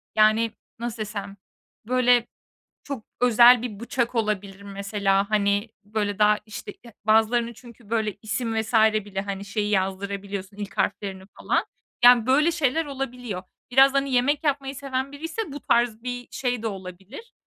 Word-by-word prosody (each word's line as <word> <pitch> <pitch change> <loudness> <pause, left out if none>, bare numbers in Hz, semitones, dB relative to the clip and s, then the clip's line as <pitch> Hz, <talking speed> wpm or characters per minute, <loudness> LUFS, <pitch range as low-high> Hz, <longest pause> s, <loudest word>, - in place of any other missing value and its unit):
yani, 215 +1 +4 0.3
nasıl 235 -1 -4
desem, 205 -2 -5 0.5
böyle, 245 -1 +3 0.6
çok 275 -6 -6 0.2
özel 240 0 +7
bir 215 -5 -6
bıçak 240 +1 -2
olabilir, 205 -3 -2
mesela, 200 0 0
hani, 205 +1 +1
böyle, 205 -1 -2
daha, 210 0 +4
işte, 205 -1 -8
e 230 - -13
bazılarını 225 +2 +3
çünkü, 235 -1 -16
böyle, 220 -3 -1
isim 225 +1 -1
vs. 225 +2 -8
bile, 215 -3 +2
hani, 200 0 -5
şeyi 205 0 -2
yazdırabiliyorsun, 200 0 -2
ilk 200 -1 -7
harflerini 190 -2 -2 0.2
falan. - - +1 0.4
Yani, 245 -1 +7
böyle 300 +6 +4
şeyler 320 -1 +1
olabiliyor. 250 -8 -5 0.3
Biraz, 270 +2 +6
hani, 275 -1 0
yemek 280 +5 +2
yapmayı 275 -2 -1
seven 270 -1 -3
biriyse 325 +6 -5
bu 285 - -6
tarz 235 -3 +1
bir 245 0 -5
şey 245 -3 -2
de 225 - 0
olabilir. 195 - -9
220 Hz, 150 wpm, -25 LUFS, 205-250 Hz, 0.6 s, özel